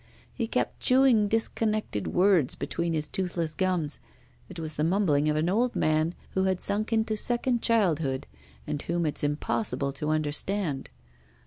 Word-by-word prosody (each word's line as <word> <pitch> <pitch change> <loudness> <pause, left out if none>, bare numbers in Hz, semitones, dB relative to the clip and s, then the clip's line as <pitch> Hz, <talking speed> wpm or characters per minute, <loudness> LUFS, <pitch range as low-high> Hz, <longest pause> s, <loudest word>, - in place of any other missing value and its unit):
He 230 - -2
kept 250 - -1
chewing 255 -5 +4
disconnected 215 - -1
words 180 -7 +3
between 170 0 -2
his 155 -1 -1
toothless 170 -4 -2
gums; 180 -6 0 0.5
it 185 - -9
was 160 -1 -5
the 150 - -1
mumbling 160 -5 +2
of 150 - +1
an 155 +2 +1
old 235 +7 +1
man 155 +2 +1 0.2
who 190 0 0
had 190 -1 +1
sunk 215 +4 +1
into 220 -1 +1
second 240 +2 0
childhood, 160 - +1 0.4
and 145 - -3
whom 170 0 -1
it's 150 - 0
impossible 145 0 -1
to 150 +2 -4
understand. 155 0 0
175 Hz, 150 wpm, -27 LUFS, 155-215 Hz, 0.5 s, chewing